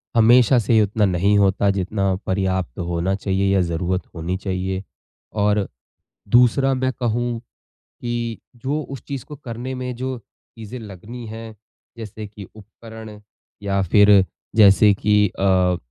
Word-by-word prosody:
हमेशा 120 Hz, +2 st, +5 dB
से 115 Hz, +1 st, 0 dB
ही 110 Hz, -, +6 dB
उतना 105 Hz, +1 st, +1 dB
नहीं 100 Hz, +3 st, +2 dB
होता 100 Hz, 0 st, +3 dB
जितना 95 Hz, 0 st, -1 dB
पर्याप्त 95 Hz, -6 st, -1 dB
होना 85 Hz, +2 st, -1 dB
चाहिए 95 Hz, 0 st, 0 dB
या 95 Hz, -, +3 dB
ज़रूरत 90 Hz, +2 st, -1 dB
होनी 85 Hz, +3 st, -3 dB
चाहिए। 95 Hz, 0 st, -3 dB, 0.5 s
और 105 Hz, -1 st, +1 dB, 0.6 s
दूसरा 125 Hz, +3 st, +4 dB
मैं 130 Hz, 0 st, 0 dB
कहूँ 120 Hz, 0 st, -2 dB, 0.4 s
कि 120 Hz, -1 st, -5 dB, 0.2 s
जो 140 Hz, +6 st, -2 dB
उस 135 Hz, -2 st, -8 dB
चीज़ 140 Hz, -3 st, -5 dB
को 150 Hz, -, -9 dB
करने 125 Hz, +1 st, -6 dB
में 125 Hz, 0 st, -4 dB
जो 130 Hz, +1 st, -4 dB
चीज़ें 115 Hz, +1 st, -12 dB
लगनी 110 Hz, +4 st, -9 dB
है, 110 Hz, 0 st, -8 dB, 0.4 s
जैसे 110 Hz, -1 st, -7 dB
कि 100 Hz, 0 st, -11 dB
उपकरण 110 Hz, 0 st, -12 dB, 0.4 s
या 100 Hz, -1 st, 0 dB
फिर 100 Hz, +1 st, +5 dB, 0.3 s
जैसे 105 Hz, -1 st, +6 dB
कि 105 Hz, 0 st, +2 dB
अ, 90 Hz, -2 st, +3 dB
105 Hz, 140 wpm, -21 LUFS, 95-120 Hz, 0.6 s, ही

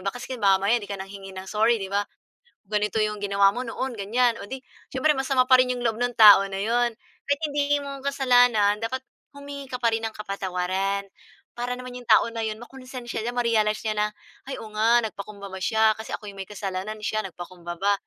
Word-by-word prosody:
baka 195 Hz, +5 st, -2 dB
kasi 255 Hz, +1 st, -5 dB
mamaya 195 Hz, +3 st, +4 dB
'di 205 Hz, -, -9 dB
ka 200 Hz, -, -4 dB
nanghingi 195 Hz, 0 st, -9 dB
ng 190 Hz, -, -6 dB
sorry 220 Hz, +2 st, +3 dB
'di 195 Hz, -3 st, -5 dB
ba, 205 Hz, 0 st, +1 dB, 0.7 s
ganito 210 Hz, 0 st, 0 dB
'yong 210 Hz, 0 st, 0 dB
ginawa 200 Hz, -1 st, +4 dB
mo 245 Hz, -, -3 dB
noon 260 Hz, +2 st, -3 dB
ganyan, 230 Hz, +4 st, +1 dB
o -, -, -6 dB
di 265 Hz, -1 st, -6 dB, 0.3 s
siyempre 300 Hz, +4 st, +3 dB
masama 265 Hz, -1 st, +2 dB
pa 255 Hz, -, +8 dB
rin 255 Hz, -, 0 dB
'yong 245 Hz, -, -5 dB
loob 220 Hz, -1 st, +1 dB
nung 245 Hz, +1 st, -1 dB
tao 205 Hz, -2 st, +9 dB
na 195 Hz, 0 st, -4 dB
'yon. 235 Hz, +2 st, +1 dB, 0.3 s
Kahit 285 Hz, +2 st, 0 dB
hindi 290 Hz, 0 st, +1 dB
mo 280 Hz, 0 st, -6 dB
kasalanan, 245 Hz, -6 st, +4 dB
dapat 230 Hz, +4 st, -3 dB, 0.3 s
humingi 280 Hz, 0 st, -8 dB
ka 250 Hz, -1 st, -5 dB
pa 235 Hz, -, +4 dB
rin 225 Hz, 0 st, -1 dB
ng 220 Hz, -, -4 dB
kapatawaran. 195 Hz, 0 st, -2 dB, 0.5 s
Para 245 Hz, +1 st, -2 dB
naman 250 Hz, 0 st, -8 dB
'yung 245 Hz, -1 st, -10 dB
tao -, -, +7 dB
na 230 Hz, -, -3 dB
'yon 215 Hz, -1 st, -2 dB
makunsensya 250 Hz, 0 st, -7 dB
siya, 240 Hz, +2 st, -3 dB
ma-realize 220 Hz, -3 st, +1 dB
niya 215 Hz, -, +1 dB
na, 210 Hz, 0 st, +2 dB, 0.4 s
"Ay -, -, -4 dB
oo 220 Hz, -, -8 dB
nga 230 Hz, +3 st, +4 dB
nagpakumbaba 200 Hz, -2 st, -7 dB
siya, 220 Hz, +2 st, +3 dB
kasi 220 Hz, +1 st, -10 dB
ako -, -, -5 dB
yung 195 Hz, -, -11 dB
may 190 Hz, -, -9 dB
kasalanan 195 Hz, +1 st, -4 dB
siya 215 Hz, 0 st, 0 dB
nagpakumbaba, 180 Hz, 0 st, -3 dB
220 Hz, 205 wpm, -25 LUFS, 200-245 Hz, 0.7 s, tao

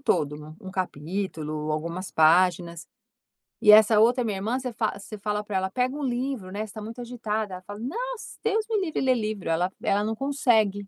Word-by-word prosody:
todo, 150 Hz, -, -1 dB
um 190 Hz, -3 st, -8 dB
capítulo, 155 Hz, -3 st, -3 dB
algumas 170 Hz, +4 st, -4 dB
páginas. 170 Hz, +1 st, +3 dB, 0.8 s
E 210 Hz, -, +8 dB
essa 215 Hz, 0 st, +7 dB
outra 245 Hz, +3 st, +4 dB
minha 210 Hz, -4 st, -2 dB
irmã, 220 Hz, +6 st, -1 dB
você 255 Hz, -1 st, -4 dB
fa 205 Hz, -, -1 dB
se 200 Hz, -, -12 dB
você 215 Hz, -, -6 dB
falar 210 Hz, +1 st, -2 dB
pra 205 Hz, -2 st, -2 dB
ela: 190 Hz, 0 st, 0 dB
"Pega 250 Hz, +6 st, 0 dB
um 295 Hz, -, -4 dB
livro, 250 Hz, -5 st, -2 dB
né, 200 Hz, -, -5 dB
você -, -, -2 dB
está 215 Hz, 0 st, -9 dB
muito 230 Hz, +3 st, -7 dB
agitada", 220 Hz, -4 st, -3 dB
ela 180 Hz, -, -9 dB
fala: 205 Hz, +2 st, -8 dB
"Nossa, 470 Hz, -, -5 dB
Deus 440 Hz, 0 st, +1 dB
me 440 Hz, -2 st, +2 dB
livre 320 Hz, -, -2 dB
ler 260 Hz, -1 st, +3 dB
livro", 215 Hz, -5 st, -3 dB
ela 170 Hz, +3 st, +1 dB
ela 205 Hz, +1 st, +2 dB
não 220 Hz, +1 st, -1 dB
consegue, 220 Hz, -7 st, +1 dB
210 Hz, 205 wpm, -26 LUFS, 185-245 Hz, 0.8 s, E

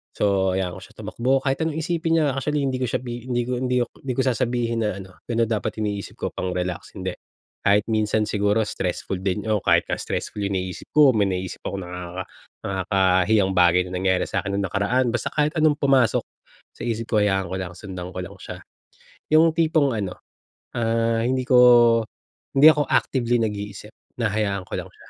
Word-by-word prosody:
So 95 Hz, -2 st, +1 dB
hayaan 95 Hz, -2 st, -2 dB
ko -, -, -17 dB
siya -, -, -21 dB
tumakbo, 130 Hz, +3 st, -1 dB
kahit 135 Hz, -1 st, 0 dB
anong 160 Hz, -2 st, -2 dB
isipin 165 Hz, 0 st, 0 dB
niya 145 Hz, -, +2 dB
actually, 145 Hz, +1 st, -1 dB
hindi 130 Hz, -2 st, -1 dB
ko 130 Hz, -, -1 dB
siya -, -, -2 dB
hindi 120 Hz, 0 st, -3 dB
ko 125 Hz, -, -5 dB
hindi 125 Hz, 0 st, 0 dB
ko -, -, -5 dB
hindi 130 Hz, -2 st, -4 dB
ko 130 Hz, -, +1 dB
sasabihin 120 Hz, -2 st, 0 dB
na -, -, -2 dB
ano, 95 Hz, -1 st, -17 dB
"Gano'n 115 Hz, -1 st, 0 dB
dapat 110 Hz, -, -1 dB
iniisip 100 Hz, -1 st, -4 dB
ko -, -, -4 dB
pang-relax." 90 Hz, -1 st, -4 dB
Hindi, 95 Hz, -2 st, -3 dB, 0.5 s
kahit 100 Hz, +1 st, +4 dB
minsan 110 Hz, 0 st, +1 dB
siguro 105 Hz, +1 st, +1 dB
stressful 90 Hz, -1 st, -3 dB
din, 100 Hz, +2 st, -2 dB
o 105 Hz, -2 st, +1 dB
kahit -, -, +3 dB
nga -, -, -2 dB
stressful 105 Hz, -, -4 dB
yung 100 Hz, 0 st, -1 dB
iniisip 90 Hz, 0 st, -6 dB
ko, 150 Hz, -3 st, +7 dB
may 100 Hz, -2 st, +3 dB
naiisip 95 Hz, -1 st, -4 dB
ako -, -, -3 dB
nakaka 90 Hz, +1 st, -6 dB, 0.4 s
nakakahiyang 95 Hz, +1 st, +2 dB
bagay 90 Hz, 0 st, +5 dB
na -, -, -10 dB
nangyari 95 Hz, 0 st, +1 dB
sa'kin 100 Hz, -, -2 dB
nung 100 Hz, -, 0 dB
nakaraan, 120 Hz, +7 st, +1 dB
basta 120 Hz, -, -1 dB
kahit 150 Hz, 0 st, +1 dB
anong 155 Hz, -2 st, +4 dB
pumasok 135 Hz, -4 st, +3 dB, 0.5 s
sa -, -, -15 dB
isip 115 Hz, -1 st, -2 dB
ko 110 Hz, -2 st, +2 dB
hayaan 95 Hz, -2 st, +1 dB
ko 95 Hz, -, -3 dB
lang 90 Hz, -1 st, -6 dB
sundan 90 Hz, -1 st, -7 dB
ko -, -, -5 dB
lang -, -, -10 dB
siya. -, -, -7 dB, 0.8 s
'Yong 160 Hz, +1 st, +5 dB
tipong 155 Hz, -5 st, +2 dB
ano, 100 Hz, -4 st, -4 dB, 0.6 s
ah, 115 Hz, 0 st, +1 dB
hindi 130 Hz, +1 st, +1 dB
ko 125 Hz, -, +4 dB, 1.0 s
hindi 140 Hz, +3 st, +8 dB
ako 150 Hz, -2 st, 0 dB
actively 120 Hz, -2 st, +1 dB
nag-iisip, 105 Hz, -1 st, -4 dB, 0.3 s
hinahayaan 105 Hz, -3 st, 0 dB
ko -, -, -11 dB
lang -, -, -8 dB
siya, -, -, -19 dB
110 Hz, 190 wpm, -23 LUFS, 95-125 Hz, 1.0 s, hindi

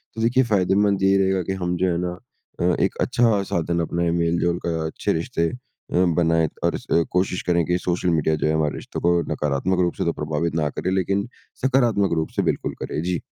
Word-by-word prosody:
तो 115 Hz, -, -4 dB
देखिए 120 Hz, +3 st, +3 dB
फ़ायदेमंद 100 Hz, -2 st, +2 dB
यही 95 Hz, 0 st, +4 dB
रहेगा 95 Hz, -1 st, +2 dB
की -, -, 0 dB
हम 90 Hz, 0 st, 0 dB
जो 95 Hz, +1 st, +1 dB
है 85 Hz, -, 0 dB
ना 90 Hz, 0 st, -3 dB, 0.4 s
अ, 90 Hz, 0 st, +3 dB
एक -, -, 0 dB
अच्छा 115 Hz, -4 st, +2 dB
साधन 85 Hz, 0 st, 0 dB
अपने 85 Hz, +1 st, 0 dB
मेल-जोल 85 Hz, +1 st, +1 dB
का 85 Hz, -1 st, 0 dB
अच्छे 80 Hz, -, -1 dB
रिश्ते 85 Hz, 0 st, -1 dB
अ, -, -, -8 dB, 0.6 s
बनाएँ 80 Hz, -2 st, +2 dB
और -, -, +1 dB
इस -, -, -7 dB, 0.3 s
कोशिश 90 Hz, 0 st, 0 dB
करें 85 Hz, -1 st, +2 dB
की 90 Hz, +1 st, +1 dB
सोशल 90 Hz, 0 st, -1 dB
मीडिया 80 Hz, -1 st, +2 dB
जो 75 Hz, -, -1 dB
है 80 Hz, -, +1 dB
हमारे 80 Hz, -1 st, 0 dB
रिश्तों -, -, -6 dB
को 85 Hz, 0 st, +3 dB
नकारात्मक 75 Hz, +6 st, 0 dB
रूप 85 Hz, -1 st, +1 dB
से -, -, -1 dB
तो 85 Hz, -, +1 dB
प्रभावित 75 Hz, +1 st, -2 dB
ना 75 Hz, -2 st, +1 dB
करें 95 Hz, -, -1 dB
लेकिन 95 Hz, +2 st, 0 dB, 0.4 s
सकारात्मक 120 Hz, -8 st, +2 dB
रूप 80 Hz, -1 st, -1 dB
से -, -, +4 dB
बिल्कुल -, -, -1 dB
करें। -, -, -3 dB
जी। 90 Hz, -2 st, -1 dB
85 Hz, 210 wpm, -23 LUFS, 85-95 Hz, 0.6 s, यही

